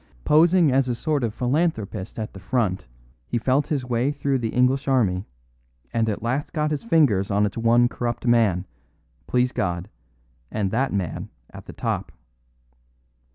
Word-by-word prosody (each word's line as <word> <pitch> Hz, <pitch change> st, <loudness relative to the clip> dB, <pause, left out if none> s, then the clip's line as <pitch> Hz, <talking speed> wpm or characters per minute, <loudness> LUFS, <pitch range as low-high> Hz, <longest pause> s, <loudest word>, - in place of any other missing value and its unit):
Posing 165 Hz, 0 st, +5 dB
as 130 Hz, 0 st, +2 dB
a 120 Hz, -, 0 dB
sort 145 Hz, +2 st, -1 dB
of 115 Hz, -, 0 dB
philanthropist 120 Hz, -, -1 dB
at 110 Hz, -1 st, -5 dB
the 95 Hz, -, -10 dB
front, 100 Hz, -, -1 dB, 0.4 s
he -, -, -1 dB
felt 130 Hz, +5 st, +1 dB
his 145 Hz, -6 st, -1 dB
way 125 Hz, +3 st, 0 dB
through 140 Hz, -2 st, -1 dB
the 115 Hz, -2 st, -2 dB
English 130 Hz, +3 st, +1 dB
Army, 105 Hz, -8 st, +1 dB, 0.7 s
and 115 Hz, -1 st, +1 dB
at 105 Hz, -, -3 dB
last 130 Hz, +5 st, -2 dB
got 150 Hz, -1 st, 0 dB
his 150 Hz, -, -1 dB
fingers 135 Hz, -, +2 dB
on 100 Hz, +1 st, +2 dB
its 100 Hz, -, -3 dB
one 115 Hz, +1 st, +4 dB
corrupt 120 Hz, 0 st, -4 dB
man 110 Hz, -7 st, +3 dB, 0.6 s
please 125 Hz, 0 st, +2 dB
God! 90 Hz, -4 st, -2 dB, 0.6 s
and 100 Hz, -3 st, -2 dB
that 130 Hz, +5 st, 0 dB
man 95 Hz, -4 st, -3 dB, 0.2 s
at -, -, -12 dB
the -, -, -8 dB
top. -, -, -3 dB
120 Hz, 160 wpm, -24 LUFS, 105-135 Hz, 0.7 s, Posing